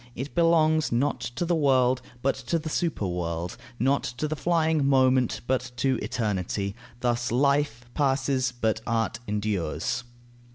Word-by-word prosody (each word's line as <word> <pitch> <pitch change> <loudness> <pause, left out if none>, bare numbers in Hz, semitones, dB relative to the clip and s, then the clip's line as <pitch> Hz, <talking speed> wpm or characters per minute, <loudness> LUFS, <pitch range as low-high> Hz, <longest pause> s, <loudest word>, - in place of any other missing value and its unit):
It 135 +3 -5
belongs 160 -2 +3
not 130 +2 +1 0.2
to 175 - -1
the 175 - +1
world, 130 -4 +3 0.2
but 135 - +3
to 170 - -2
the 160 0 -4
superworld; 90 - -2 0.2
not 135 +4 +2
to 125 +6 -3
the 155 - -2
flying 160 -2 +1
moment, 130 -2 +3
but 130 0 0
to 130 +1 +1
eternity. 100 -2 -2 0.3
Thus 120 -1 0
life 140 -1 +1
passes, 135 -2 +1
but 110 -3 -1
art 115 -1 0
endures. 105 0 -1
130 Hz, 135 wpm, -26 LUFS, 115-145 Hz, 0.3 s, belongs